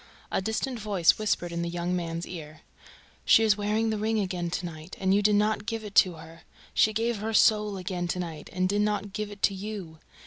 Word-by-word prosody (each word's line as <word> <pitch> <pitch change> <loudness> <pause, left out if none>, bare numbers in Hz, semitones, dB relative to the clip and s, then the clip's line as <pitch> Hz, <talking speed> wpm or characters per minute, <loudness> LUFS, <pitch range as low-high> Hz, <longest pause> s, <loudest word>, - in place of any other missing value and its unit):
A - - +1
distant 225 +5 -2
voice 200 -5 +3
whispered 185 -5 0
in 170 0 -3
the 170 - -2
young 175 +1 -2
man's 170 -1 -3
ear: 155 -3 -9 0.6
"She 225 - +6
is 215 -2 +4
wearing 215 +2 0
the 215 - -2
ring 220 +1 0
again 180 -3 -2
to 180 +1 -3
night; 160 0 -8
and 190 0 +2
you 205 - +4
did 210 0 +4
not 210 +1 +1
give 225 -1 -3
it 210 -1 -8
to 185 - +6
her. 165 +1 -12 0.3
She 215 - +4
gave 225 +1 0
her 220 +2 -3
soul 210 -3 +4
again 180 -1 -3
tonight 170 -4 -4
and 185 0 0
did 205 +2 +1
not 210 -1 -1
give 210 +1 -3
it 205 -1 -12
to 200 - +4
you... 190 -5 -7
200 Hz, 220 wpm, -27 LUFS, 175-215 Hz, 0.6 s, She